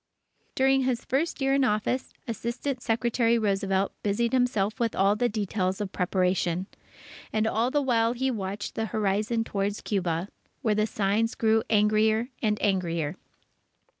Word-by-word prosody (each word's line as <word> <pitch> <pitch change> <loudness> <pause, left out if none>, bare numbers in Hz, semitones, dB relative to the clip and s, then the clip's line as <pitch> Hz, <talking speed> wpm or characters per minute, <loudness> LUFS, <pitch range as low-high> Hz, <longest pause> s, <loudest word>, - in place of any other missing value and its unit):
During 270 0 +3
his 255 -2 -1
first 290 +3 -1
year 270 0 +2
in 275 0 +3
office, 250 +2 0 0.2
Assistant 240 +4 -3
Secretary 235 0 +1
Roosevelt 195 -2 0
busied 230 +4 0
himself 220 -5 +1
with 230 -2 0
all 195 +2 +3
the 240 +3 +1
details 200 -2 -1
of 205 -2 -3
preparation. 180 -1 0 0.7
And 215 0 +1
all 225 +2 +1
the 290 +2 +1
while 230 -3 +2
he 260 +2 0
watched 200 -2 -4
the 225 - -2
horizon 215 +2 0
towards 200 -1 -2
Cuba, 180 -2 -1 0.3
where 220 - +3
the 215 +1 +1
signs 215 +2 0
grew 220 0 +3
angrier 215 +2 +3
and 210 -2 +1
angrier. 170 -5 0
215 Hz, 145 wpm, -27 LUFS, 195-235 Hz, 0.7 s, During